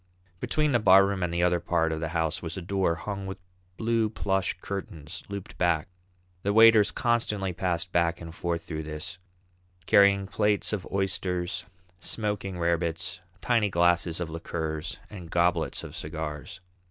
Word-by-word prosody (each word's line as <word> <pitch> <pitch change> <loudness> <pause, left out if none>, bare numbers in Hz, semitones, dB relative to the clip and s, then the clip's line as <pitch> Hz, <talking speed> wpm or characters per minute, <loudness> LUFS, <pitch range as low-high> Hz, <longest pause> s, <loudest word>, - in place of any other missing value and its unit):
Between 150 +7 +1
the 120 - +3
barroom 100 -1 +5
and 90 -1 0
the 85 0 0
other 90 -1 +3
part 85 -1 +1
of 80 - -2
the 80 - -2
house 80 -1 -1
was 85 0 -5
a - - -4
door 95 -2 +1
hung 95 +3 -5
with 95 +1 -5 0.4
blue 115 -1 +1
plush 95 -3 -1
curtains, 85 -4 -6
looped 100 -2 -7
back; 85 -2 +2 0.5
the 100 +2 0
waiters 110 -2 +7
constantly 105 -4 0
passed 90 0 -1
back 85 0 +1
and 85 -1 -8
forth 85 -1 -2
through 80 -2 -5
this, 80 +5 -5 0.7
carrying 100 0 +5
plates 105 +1 +1
of 100 -4 -3
oysters, 90 -2 -1 0.3
smoking 105 -1 -3
rarebits, 85 0 -1 0.2
tiny 115 -4 +2
glasses 85 -1 +2
of 85 -3 -3
liqueurs, 80 -1 -4
and 90 -5 -9
goblets 85 -1 +1
of - - -8
cigars. 80 +2 -5
90 Hz, 155 wpm, -27 LUFS, 85-100 Hz, 0.7 s, waiters